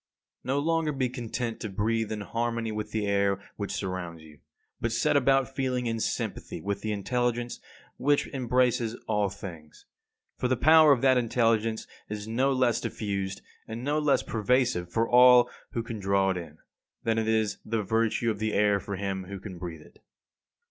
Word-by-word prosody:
54. 130 - -1
No - - +2
longer 165 -2 +1
be 130 -2 0
content 120 -1 -4
to 110 - -4
breathe 110 +3 -1
in 105 -1 -3
harmony 115 +1 -2
with 105 0 -4
the 110 -2 -2
air 100 -1 +1 0.2
which 100 -1 -4
surrounds 90 -4 -4
you; 75 -2 -16 0.4
but - - -1
set - - +1
about 135 0 +3
feeling 130 -2 -1
in 115 -1 -1
sympathy - - -3
with 100 0 -3
the 110 - -2
intelligence 120 +3 -1 0.4
which 145 +1 +2
embraces 125 -3 +1
all 105 -2 +1
things. 85 -6 -10 0.5
For 125 - +1
the 130 0 +1
power 155 +2 +7
of 130 -4 +3
that 130 -2 +5
intelligence 115 -2 +1 0.2
is 105 0 -5
no 130 +5 +1
less 130 -3 +2
diffused, 100 -2 -3 0.2
and 115 +2 -6
no 145 +3 +1
less 150 -2 +2
pervasive 115 -5 0
for 115 0 +1
all 125 0 +7 0.2
who 115 - -1
can 115 -1 -6
draw 95 0 +2
it 95 - -2
in, 80 -3 -8 0.5
than 115 0 +1
is 110 -1 +1
the 110 -1 -1
virtue 115 +2 +1
of 105 - -5
the 110 0 -1
air 105 -1 +3
for 100 0 -5
him 95 -1 -3
who 100 +1 -7
can 95 -2 -9
breathe 85 -3 -6
it. - - -19
110 Hz, 180 wpm, -28 LUFS, 100-125 Hz, 0.5 s, power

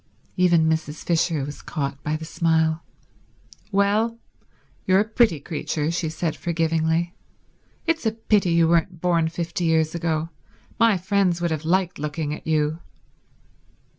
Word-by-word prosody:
Even 175 -3 +4
Mrs. 160 -1 -2
Fisher 165 -4 +1
was 145 +1 -8
caught 140 -3 -4
by 150 +1 -1
the 160 +1 -5
smile. 160 0 +1 0.9
"Well, 210 +3 +2 0.7
you're 190 0 +5
a - - 0
pretty 220 -8 +3
creature," 150 +1 -2
she 170 -1 -1
said 160 +1 -2
forgivingly. 165 0 0 0.7
"It's 325 -7 0
a - - +2
pity 215 -4 +1
you 165 -1 +4
weren't 170 +1 +1
born 170 -2 +2
fifty 170 +1 -3
years 160 -1 +2
ago. 165 -1 -1 0.5
My 230 -4 +5
friends 185 -1 +1
would 170 -1 -1
have 155 -1 -3
liked 180 0 +1
looking 150 0 -3
at 155 - -9
you." 155 0 +1
165 Hz, 140 wpm, -23 LUFS, 160-180 Hz, 0.9 s, you're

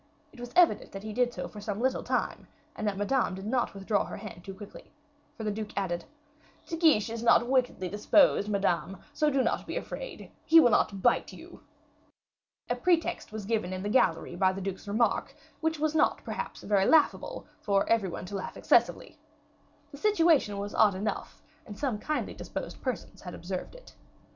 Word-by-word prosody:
It 265 - -15
was 245 0 -7
evident 355 -2 +4
that 195 0 -7
he 215 0 -6
did 245 +1 +1
so - - -5
for 210 - -10
some 205 0 -4
little 260 +2 +1
time, - - -2 0.3
and 215 - -3
that 200 -2 -1
Madame 205 -1 +1
did 190 +1 -8
not 240 -1 0
withdraw 200 +1 0
her - - -7
hand 185 -5 -9
too 195 0 -8
quickly, 205 +1 -12 0.5
for 225 - -6
the 210 - -1
duke 210 -1 -6
added: 175 -3 -2 0.6
"De 330 - -4
Guiche 310 - +3
is 230 0 -4
not 235 0 +4
wickedly 250 -7 +1
disposed, 210 - +3
Madame; 195 -2 0 0.2
so 300 +1 +2
do 270 -2 +2
not - - -1
be - - -3
afraid, - - -7
he 325 +1 +7
will 245 -7 +5
not 195 -2 +1
bite - - +2
you." - - -13 1.1
A - - 0
pretext 345 - 0
was 215 -2 -6
given 215 -4 -1
in 185 0 -4
the 205 - -2
gallery 175 -8 +2
by 185 +1 +3
the 190 - -6
duke's 195 +1 -5
remark, 220 +4 0 0.2
which 320 0 0
was 310 0 0
not, 315 - +2
perhaps, - - -5
very 200 -2 +2
laughable, 320 +10 +2 0.2
for 200 -1 +1
every 225 -5 +2
one 175 - -6
to 200 - -7
laugh 190 - -5
excessively. - - +2 0.7
The 280 - -10
situation 330 - +3
was 200 +1 -4
odd 205 -3 +4
enough, 210 +3 -4 0.2
and 205 -2 -10
some 255 -7 -2
kindly 305 +7 -2
disposed - - -7
persons 255 -4 -5
had 180 - -8
observed 185 - -6
it. - - -15
215 Hz, 190 wpm, -29 LUFS, 195-265 Hz, 1.1 s, he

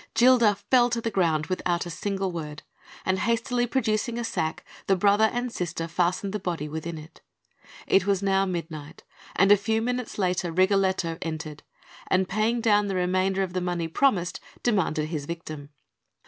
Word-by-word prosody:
Gilda 235 -4 +5
fell 240 +5 +3
to 235 -1 -1
the 230 0 -2
ground 165 -6 +1
without 175 -1 -1
a 175 - -6
single 195 +2 -2
word; 150 -3 -6 0.4
and 185 0 +1
hastily 235 +3 0
producing 235 -1 0
a 240 - -2
sack, 160 -8 -3 0.2
the 195 - +4
brother 205 +3 +4
and 245 0 -2
sister 170 -4 -3
fastened 180 +3 0
the 210 - -2
body 170 -5 -3
within 160 +2 -5
it. 155 +2 -13 0.6
It 195 0 +3
was 200 -1 +1
now 195 0 +2
midnight; 165 -4 -6 0.3
and 195 +2 +4
a - - +10
few 220 +2 0
minutes 245 +1 -3
later, 180 -3 0
Rigoletto 185 -2 +1
entered, 155 -2 -5 0.5
and 185 0 +2
paying 220 +5 0
down 210 -2 +3
the 195 - -2
remainder 185 +1 +1
of 185 -2 -5
the 185 - -1
money 175 -2 -2
promised, 180 -1 +1 0.2
demanded 165 -9 +1
his 155 -4 -4
victim. 155 -4 -7
190 Hz, 170 wpm, -26 LUFS, 170-215 Hz, 0.6 s, a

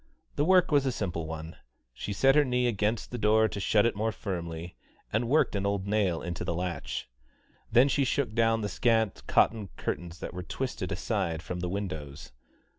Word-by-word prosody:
The 145 - +2
work 185 -1 +5
was 140 -2 +3
a - - +2
simple 85 -8 -3
one: 80 +1 -7 0.4
she 100 - -5
set 135 +7 +4
her 150 +1 +5
knee 125 -2 +1
against 110 -1 0
the 120 - -4
door 110 +1 +4
to 100 - -5
shut 105 +2 +3
it 115 - +1
more 110 +2 0
firmly, 85 -4 -5 0.4
and 115 +2 +1
worked 150 -5 +3
an 100 - -1
old 100 -1 -1
nail 100 -5 +1
into 85 0 -4
the 85 - -2
latch. 90 -5 -3 0.6
Then 120 +4 +6
she 140 0 +2
shook 130 -3 0
down 115 0 +2
the 105 - -1
scant 110 -1 +1
cotton 110 -3 +3
curtains 85 -1 -4
that - - -6
were 90 - -5
twisted 90 - -4
aside 80 -1 -2
from 90 0 -5
the 90 0 -2
windows. 80 -9 -5
105 Hz, 190 wpm, -29 LUFS, 90-115 Hz, 0.6 s, Then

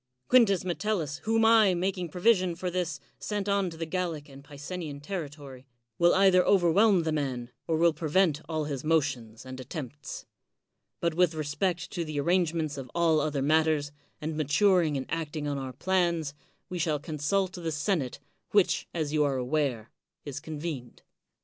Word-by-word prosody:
Quintns 200 -7 +5
Metellus, 175 -5 -1
whom 225 0 +3
I, 220 -4 +6
making 180 -1 -2
provision 185 0 +2
for 180 +1 -3
this, 170 -5 -2 0.2
sent 205 -1 -3
on 200 -2 +1
to 165 - -10
the 165 - -3
Gallic 160 -3 -3
and 135 0 -13
Picenian 145 +1 -7
territory, 145 -5 -7 0.3
will 175 0 +5
either 190 -1 +5
overwhelm 190 +1 +4
the 160 - -1
man, 130 -5 -2 0.2
or 160 - +1
will 170 0 +4
prevent 160 -1 +1
all 155 -1 -1
his 140 -3 -4
motions 135 -7 -1
and 130 0 -8
attempts; 145 0 -7 0.8
but 170 -1 +1
with 175 -1 +2
respect 155 +4 -2
to 170 - -2
the 155 -2 -5
ar 140 - -2
rangements 165 -4 +1
of 130 -2 -8
all 165 -2 +3
other 145 -3 -1
matters, 155 -1 +2 0.3
and 155 +1 -4
maturing 155 +1 +3
and 130 - -3
acting 155 -2 -3
on 140 -1 -2
our 130 -1 -5
plans, 170 -1 0 0.3
we 180 -2 -5
shall 155 -2 +1
consult 160 +6 -1
the 170 -3 -4
senate, 150 -3 -1 0.4
wMch, 200 -3 +3
as 155 -3 -1
you 150 -1 +3
are 140 -2 +1
aware, 125 -4 -1 0.3
is 140 -1 -5
convened. 150 -4 -6
160 Hz, 165 wpm, -28 LUFS, 145-180 Hz, 0.8 s, I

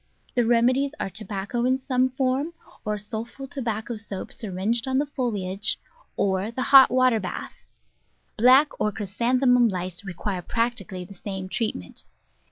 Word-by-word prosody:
The 240 -2 +2
rem 235 0 +4
edies 275 +3 +1
are 195 - -3
tobacco 205 +3 -3
in 255 +1 +3
some 260 -1 +1
form, 265 +5 -1 0.3
or 210 0 -1
sulpho 225 +6 -6
tobacco 230 -4 -3
soap 200 -3 -6
syringed 220 +4 -2
on 260 0 +1
the 285 - +2
foliage, 210 -8 -1 0.4
or 195 +1 +1
the 255 +3 -3
hot 270 -1 +8
water 255 -2 +3
bath. 185 - -5 0.8
Black 255 +6 +6
or 210 - +2
Chrysanthemum 240 +5 +2
Lice 185 -2 -4
require 190 0 -4
practically 230 -4 -2
the 200 - -12
same 190 -1 -6
treatment. 190 - -3
230 Hz, 145 wpm, -25 LUFS, 195-255 Hz, 0.8 s, hot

